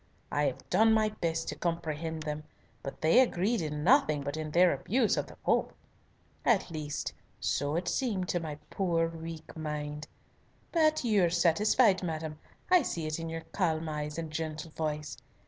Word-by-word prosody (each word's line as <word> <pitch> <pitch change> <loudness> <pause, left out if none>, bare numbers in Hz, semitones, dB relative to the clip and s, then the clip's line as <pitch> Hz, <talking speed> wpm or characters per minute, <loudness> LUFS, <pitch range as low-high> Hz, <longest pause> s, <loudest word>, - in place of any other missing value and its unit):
I 145 0 +2
have 135 -3 -3
done 220 0 +5
my 215 -1 +3
best 165 -5 -2
to - - -3
comprehend 160 -2 -3
them, 150 0 -4 0.4
but 135 - -7
they 160 +10 +6
agreed 230 -3 +2
in 150 -1 -3
nothing 175 - +4
but 145 +1 -3
in 155 -1 -4
their 175 +3 +5
abuse 220 - +1
of - - -2
the - - -12
Pope. - - +1 0.7
At 205 -7 +2
least 150 -2 -4 0.3
so 145 +2 0
it 175 +1 -1
seemed 200 -5 0
to 175 - +1
my 155 -3 -5 0.2
poor 170 -4 +1
weak 165 -1 -8
mind. 150 -1 -4 0.6
But 310 -3 +3
you 215 -5 +3
are - - +2
satisfied, 185 +5 +4
madam, 160 -3 -4 0.3
I 365 -1 +7
see 170 - -3
it 155 +2 -2
in 165 0 -4
your 165 0 -5
calm 165 -4 0
eyes 150 0 -4
and 165 -2 -4
gentle 160 0 -4
voice. 150 -1 -3
165 Hz, 175 wpm, -30 LUFS, 155-185 Hz, 0.7 s, I